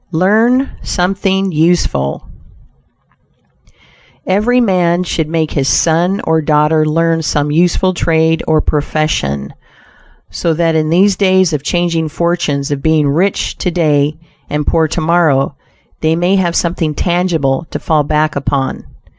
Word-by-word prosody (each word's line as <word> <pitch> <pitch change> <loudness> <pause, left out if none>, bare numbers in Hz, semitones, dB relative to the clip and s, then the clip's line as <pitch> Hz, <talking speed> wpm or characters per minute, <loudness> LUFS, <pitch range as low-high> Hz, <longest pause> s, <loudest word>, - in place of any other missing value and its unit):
LEARN 220 +10 +2
SOMETHING 190 +1 -1
USEFUL 155 - 0 2.0
Every 215 +6 +1
man 180 -6 +1
should 160 -3 -2
make 160 -1 -1
his 135 -2 -1
son 175 +7 +1
or 160 0 +1
daughter 155 +1 +2
learn 165 +1 +1
some 150 -1 -1
useful 180 +3 +1
trade 160 -1 +1
or 155 -1 +2
profession, 145 - -2 0.8
so 165 -2 -1
that 165 0 +1
in 155 -1 0
these 190 +4 +3
days 185 -3 +2
of 150 - -1
changing 165 0 -1
fortunes 155 -3 -1
of 140 -1 -2
being 155 -1 +2
rich 180 +7 -1
to - - -1
day 150 -4 +1 0.3
and 150 0 -2
poor 160 -1 +1
tomorrow 155 -4 +1 0.4
they 160 0 +1
may 175 +3 +1
have 175 -3 0
something 165 -3 -1
tangible 165 -5 -1
to - - -4
fall 155 -2 0
back 155 +1 0
upon. 140 -1 -2
165 Hz, 130 wpm, -14 LUFS, 150-180 Hz, 2.0 s, these